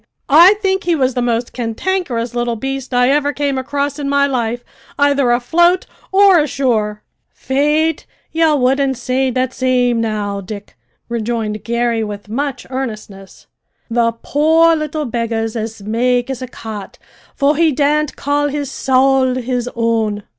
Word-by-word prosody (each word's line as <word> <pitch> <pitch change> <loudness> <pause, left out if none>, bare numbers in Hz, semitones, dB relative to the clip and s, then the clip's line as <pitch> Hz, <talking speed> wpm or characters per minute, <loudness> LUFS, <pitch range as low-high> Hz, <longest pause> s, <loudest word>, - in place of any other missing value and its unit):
"I 350 +7 +8
think 385 0 0
he 345 -1 +2
was 260 -3 +1
the 245 - -1
most 240 0 -1
cantankerous 240 0 -2
little 240 -1 -1
beast 270 +3 -5
I 250 +1 +3
ever 290 0 +2
came 285 -2 -1
across 280 +2 -2
in 280 -1 -2
my 280 0 +3
life, 245 -3 -2 0.3
either 285 -2 +2
afloat 345 +10 +3 0.3
or 390 -2 +6
ashore!" 235 -8 -1 0.3
"Faith, 300 +4 0 0.2
ye 325 -1 +3
wouldn't 265 0 +1
say 260 +2 0
that 255 +1 -1
same 245 -2 +1
now, 205 -3 -2
Dick," 200 +1 -9 0.3
rejoined 225 -2 -3
Garry 235 -1 0
with 205 -1 -7
much 275 +4 -3
earnestness. 215 -7 -7 0.5
"The 230 0 +2
poor 325 +3 +4
little 305 -1 -3
beggar's 230 -2 -2
as 220 -2 -5
make 245 +4 0
as 260 -1 -5
a 255 - -5
cat, 220 -4 -8 0.4
for 280 +2 +2
he 325 +1 +3
daren't 295 +1 +1
call 290 +1 0
his 285 -1 -3
sowl 265 -1 +2
his 250 -1 -2
own!" 225 -3 0
255 Hz, 145 wpm, -17 LUFS, 230-285 Hz, 0.5 s, I